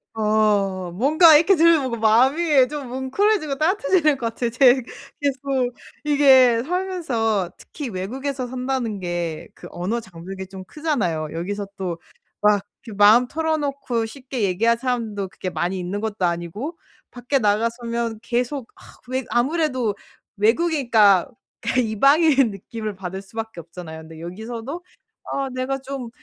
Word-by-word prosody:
아 210 Hz, -4 st, +1 dB
뭔가 310 Hz, -, +6 dB
이렇게 330 Hz, +6 st, +5 dB
들으면 310 Hz, -8 st, +3 dB
마음이 265 Hz, +6 st, +4 dB
좀 290 Hz, -2 st, -6 dB
뭉클해지고 280 Hz, -, 0 dB
따뜻해지는 310 Hz, -2 st, +2 dB
것 240 Hz, -3 st, -2 dB
같아요. 230 Hz, +1 st, -2 dB
제 250 Hz, +1 st, +6 dB, 0.5 s
계속 265 Hz, -3 st, -1 dB, 0.3 s
이게 265 Hz, -5 st, +5 dB
살면서 265 Hz, -, -1 dB
특히 290 Hz, -5 st, -7 dB
외국에서 255 Hz, +8 st, -4 dB
산다는 250 Hz, -4 st, -3 dB
게 175 Hz, -3 st, -4 dB
그 -, -, -11 dB
언어 185 Hz, +7 st, -2 dB
장벽이 190 Hz, -2 st, -9 dB
좀 190 Hz, 0 st, -9 dB
크잖아요. 185 Hz, -, -2 dB
여기서 200 Hz, +5 st, -4 dB
또 180 Hz, -3 st, -3 dB, 0.4 s
막 210 Hz, -1 st, +4 dB, 0.2 s
이렇게 215 Hz, -4 st, -9 dB
마음 215 Hz, +4 st, +7 dB
털어놓고 285 Hz, -7 st, -1 dB
쉽게 255 Hz, +1 st, -6 dB
얘기할 215 Hz, +5 st, +2 dB
사람도 230 Hz, -6 st, -2 dB
그렇게 185 Hz, -, -5 dB
많이 175 Hz, +3 st, -2 dB
있는 185 Hz, +3 st, -4 dB
것도 210 Hz, -4 st, -1 dB
아니고 175 Hz, -, -3 dB, 0.3 s
밖에 250 Hz, +3 st, -1 dB
나가 215 Hz, +1 st, +2 dB
서면 235 Hz, -2 st, -3 dB
계속 245 Hz, +2 st, -2 dB
아 -, -, -19 dB, 0.3 s
왜 260 Hz, +1 st, -2 dB
아무래도 255 Hz, -4 st, 0 dB, 0.4 s
외국이니까 225 Hz, -, +3 dB, 0.3 s
그 235 Hz, +1 st, 0 dB
이방인 275 Hz, +3 st, +4 dB
느낌을 215 Hz, +2 st, -6 dB
받을 190 Hz, 0 st, -6 dB
수밖에 220 Hz, -2 st, -7 dB
없잖아요. 165 Hz, -1 st, -10 dB
근데 160 Hz, 0 st, -12 dB
여기서도 225 Hz, -, -6 dB, 0.5 s
아 275 Hz, -1 st, -1 dB
내가 255 Hz, +1 st, -2 dB
좀 270 Hz, -2 st, -6 dB
235 Hz, 310 characters per minute, -22 LUFS, 200-275 Hz, 0.5 s, 마음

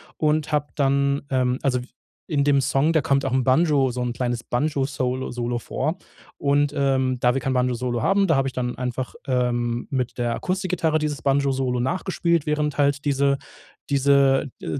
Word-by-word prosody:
und 155 Hz, 0 st, 0 dB
habe 145 Hz, 0 st, +1 dB
dann, 140 Hz, 0 st, +1 dB
ähm, 130 Hz, -1 st, +1 dB
also, 125 Hz, -3 st, 0 dB
w -, -, -10 dB, 0.4 s
in 145 Hz, -3 st, +1 dB
dem 140 Hz, -1 st, +4 dB
Song, 135 Hz, +5 st, +1 dB
da 160 Hz, -, +3 dB
kommt 140 Hz, 0 st, +1 dB
auch 135 Hz, -, -1 dB
'n 130 Hz, -1 st, +2 dB
Banjo 135 Hz, -1 st, +3 dB
so 125 Hz, 0 st, -4 dB
'n 120 Hz, -1 st, -2 dB
kleines 120 Hz, -1 st, -3 dB
Banjo-Solo 130 Hz, -1 st, -1 dB
Solo 120 Hz, 0 st, -2 dB
vor. 155 Hz, +9 st, -3 dB, 0.4 s
Und, 145 Hz, 0 st, +2 dB
ähm, 130 Hz, -3 st, +1 dB
da 125 Hz, 0 st, +3 dB
wir 135 Hz, -, -1 dB
kein 135 Hz, -, -1 dB
Banjo 125 Hz, -1 st, +1 dB
solo 120 Hz, -1 st, -2 dB
haben, 195 Hz, +5 st, +2 dB
da 160 Hz, -4 st, +3 dB
habe 135 Hz, -, +1 dB
ich 130 Hz, -, -4 dB
dann 125 Hz, -1 st, -3 dB
einfach, 125 Hz, 0 st, -4 dB
ähm, 120 Hz, -2 st, 0 dB
mit 130 Hz, -3 st, -2 dB
der 120 Hz, -1 st, 0 dB
Akustikgitarre 180 Hz, -4 st, -1 dB
dieses 150 Hz, -4 st, -3 dB
Banjo-Solo 135 Hz, -2 st, +1 dB
nachgespielt, 170 Hz, +1 st, 0 dB
während 150 Hz, -1 st, -1 dB
halt 140 Hz, 0 st, +1 dB
diese 140 Hz, -1 st, +2 dB, 0.5 s
diese 140 Hz, 0 st, +3 dB
äh, 140 Hz, -, -3 dB
135 Hz, 185 wpm, -23 LUFS, 125-145 Hz, 0.5 s, dem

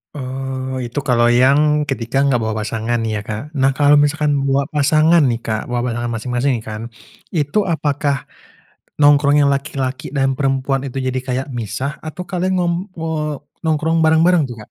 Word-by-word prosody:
Oh, 130 Hz, -1 st, -4 dB
itu 120 Hz, +4 st, -3 dB
kalau 120 Hz, -2 st, +3 dB
yang 140 Hz, +5 st, +4 dB
ketika 135 Hz, +1 st, 0 dB
enggak 135 Hz, -3 st, +2 dB
bawa 110 Hz, -1 st, -2 dB
pasangan 115 Hz, +2 st, -2 dB
ya, 110 Hz, -1 st, -2 dB
Kak. 110 Hz, +8 st, -6 dB
Nah, 135 Hz, +1 st, +4 dB
kalau 145 Hz, 0 st, +5 dB
misalkan 150 Hz, 0 st, +1 dB, 0.2 s
bawa 135 Hz, +1 st, +2 dB
pasangan 155 Hz, +3 st, +4 dB
nih, 120 Hz, -2 st, 0 dB
Kak, 110 Hz, -1 st, -2 dB
bawa 120 Hz, -1 st, -1 dB
pasangan 120 Hz, +1 st, -3 dB
masing-masing 125 Hz, +1 st, -1 dB
kan. 110 Hz, 0 st, -6 dB, 0.5 s
Itu 165 Hz, +7 st, +1 dB
apakah 145 Hz, -4 st, -1 dB, 0.7 s
nongkrong 145 Hz, 0 st, +5 dB
yang 140 Hz, -, +3 dB
laki-laki 135 Hz, 0 st, -3 dB
dan 135 Hz, 0 st, +2 dB
perempuan 135 Hz, 0 st, 0 dB
itu 130 Hz, -, -10 dB
jadi 130 Hz, -1 st, -1 dB
kayak 130 Hz, +1 st, -1 dB
misah 120 Hz, +5 st, -4 dB
atau 160 Hz, +3 st, -7 dB
kalian 185 Hz, +1 st, -2 dB
ngem 175 Hz, -1 st, +1 dB, 0.2 s
eee, 160 Hz, -2 st, -2 dB, 0.4 s
nongkrong 160 Hz, +1 st, +1 dB
bareng-bareng 160 Hz, +2 st, +4 dB
tuh, 120 Hz, -, -8 dB
Kak? -, -, -30 dB
135 Hz, 165 wpm, -18 LUFS, 125-150 Hz, 0.7 s, kalau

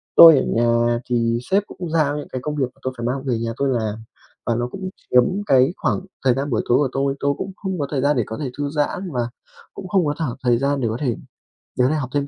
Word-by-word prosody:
tôi 165 Hz, -4 st, +10 dB
ở -, -, -1 dB
nhà 120 Hz, 0 st, +2 dB
thì 115 Hz, -1 st, +1 dB
sếp 200 Hz, +1 st, +4 dB
cũng 175 Hz, -3 st, -7 dB
giao 150 Hz, -3 st, +1 dB
những 145 Hz, -, -6 dB
cái 130 Hz, -, -4 dB
công 150 Hz, +3 st, -3 dB
việc 135 Hz, -3 st, +1 dB
mà -, -, -27 dB
tôi 130 Hz, 0 st, -2 dB
phải 115 Hz, -, -4 dB
mang 130 Hz, +2 st, -2 dB
về 120 Hz, -4 st, -1 dB
nhà 115 Hz, 0 st, -2 dB
tôi 140 Hz, -, +1 dB
làm. 110 Hz, -3 st, -2 dB, 0.4 s
Và 115 Hz, -, +1 dB
nó 120 Hz, +1 st, -1 dB
cũng 190 Hz, -1 st, -5 dB, 0.2 s
chiếm 125 Hz, 0 st, +6 dB, 0.2 s
cái 135 Hz, +3 st, +4 dB
khoảng -, -, 0 dB, 0.3 s
thời 125 Hz, -, +5 dB
gian 140 Hz, +2 st, -2 dB
buổi 115 Hz, -, +1 dB
tối 120 Hz, -, +5 dB
của 140 Hz, -3 st, +2 dB
tôi. 135 Hz, 0 st, 0 dB
Tôi 140 Hz, 0 st, +1 dB
cũng 195 Hz, -, -4 dB
không 190 Hz, -3 st, -4 dB
có 140 Hz, -, -1 dB
thời 135 Hz, -3 st, 0 dB
gian 145 Hz, +1 st, +2 dB
để 120 Hz, -, +2 dB
có 110 Hz, -, -5 dB
thể 135 Hz, -4 st, -3 dB
thư 145 Hz, -, -1 dB
giãn 155 Hz, +5 st, -2 dB
và 120 Hz, -2 st, -1 dB, 0.4 s
cũng 190 Hz, -, -8 dB
không 185 Hz, -4 st, +2 dB
có 145 Hz, -, 0 dB
thở 155 Hz, -8 st, -2 dB
thời 120 Hz, -1 st, +3 dB
gian 140 Hz, 0 st, 0 dB
để 115 Hz, -, +1 dB
có 110 Hz, -, -2 dB
thể 125 Hz, -5 st, 0 dB, 0.6 s
đứa 125 Hz, +1 st, +4 dB
này 155 Hz, -, +1 dB
học 130 Hz, -2 st, -4 dB
thêm 140 Hz, -1 st, 0 dB
135 Hz, 275 wpm, -21 LUFS, 120-150 Hz, 0.6 s, tôi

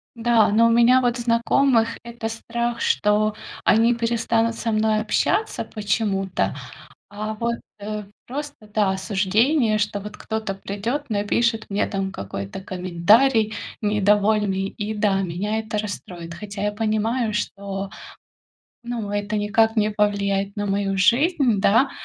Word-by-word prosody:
Да, 230 Hz, -1 st, +3 dB
но 225 Hz, +3 st, +4 dB
у -, -, +3 dB
меня, 240 Hz, +2 st, +5 dB
вот, 245 Hz, 0 st, +1 dB
знакомых 235 Hz, 0 st, +2 dB
это 235 Hz, -1 st, -5 dB
страх, 235 Hz, +1 st, -3 dB
что 210 Hz, +1 st, +2 dB, 0.3 s
они 230 Hz, +2 st, +4 dB
перестанут 230 Hz, 0 st, 0 dB
со 230 Hz, 0 st, -2 dB
мной 215 Hz, 0 st, +2 dB
общаться 220 Hz, -, 0 dB
почему-то, 200 Hz, -3 st, -1 dB, 0.5 s
а 215 Hz, +1 st, -5 dB
вот, 235 Hz, +2 st, -2 dB, 0.2 s
э, 210 Hz, +1 st, -5 dB, 0.2 s
просто, 285 Hz, -4 st, -7 dB
да, 210 Hz, -3 st, +3 dB
осуждение, 215 Hz, +6 st, +1 dB
что 210 Hz, -1 st, -1 dB
вот 210 Hz, +1 st, -8 dB
кто-то 220 Hz, -3 st, -4 dB
придёт, 225 Hz, +9 st, -4 dB
напишет 220 Hz, +2 st, 0 dB
мне 200 Hz, +1 st, +1 dB
там 195 Hz, -1 st, -2 dB
какой-то 100 Hz, -, -6 dB
комментарий 205 Hz, +6 st, +2 dB, 0.3 s
недовольный, 205 Hz, -1 st, +2 dB
и, 205 Hz, +2 st, -4 dB
да, 205 Hz, -2 st, +1 dB
меня 195 Hz, +5 st, -2 dB
это 215 Hz, -1 st, -4 dB
расстроит. 180 Hz, -5 st, -6 dB
Хотя 200 Hz, +2 st, -7 dB
я 210 Hz, 0 st, 0 dB
понимаю, 220 Hz, +2 st, 0 dB
что, 200 Hz, -1 st, -4 dB, 0.9 s
ну, 235 Hz, -4 st, -4 dB
это 205 Hz, +1 st, -2 dB
никак 220 Hz, +2 st, +2 dB
не 215 Hz, 0 st, +2 dB
повлияет 200 Hz, -1 st, 0 dB
на 205 Hz, -, -2 dB
мою 195 Hz, -1 st, -1 dB
жизнь, 245 Hz, -, +3 dB
да, 225 Hz, +8 st, +4 dB
215 Hz, 135 wpm, -23 LUFS, 200-230 Hz, 0.9 s, меня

